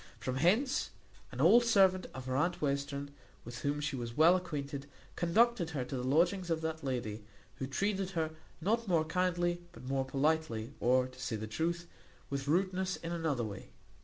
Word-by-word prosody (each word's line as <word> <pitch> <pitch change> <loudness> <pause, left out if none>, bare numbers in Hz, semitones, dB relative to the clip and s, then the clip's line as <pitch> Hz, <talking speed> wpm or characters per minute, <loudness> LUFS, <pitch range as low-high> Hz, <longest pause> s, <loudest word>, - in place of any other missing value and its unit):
From 130 0 -3
hence, 220 - +2 0.4
an - - -8
old 240 +1 +7
servant 190 -5 +4
of 130 -1 -6
her 130 0 -2
aunt 175 +6 +1
Western, 140 0 -2 0.3
with 120 +1 -7
whom 145 +2 -1
she 145 -1 -2
was 120 -2 -5
well 165 +4 +7
acquainted, 145 -6 -4 0.3
conducted 185 +1 +3
her 140 -6 -3
to 135 - -5
the 125 - -2
lodgings 170 +7 +2
of 160 -1 0
that 160 -1 -3
lady, 115 -5 -3 0.3
who 130 - -3
treated 195 +6 -1
her 160 -1 0 0.3
not 225 +7 0
more 165 -4 +3
kindly, 175 +1 0
but - - -13
more 135 +1 0
politely; 135 -4 0
or, 125 +1 +3
to 130 0 -13
say 110 - -2
the 110 0 -4
truth, 170 +9 -2 0.4
with 140 0 -3
rudeness 185 +3 +1
in 165 - -6
another 160 -7 -1
way. 100 -3 -7
155 Hz, 180 wpm, -33 LUFS, 130-180 Hz, 0.4 s, old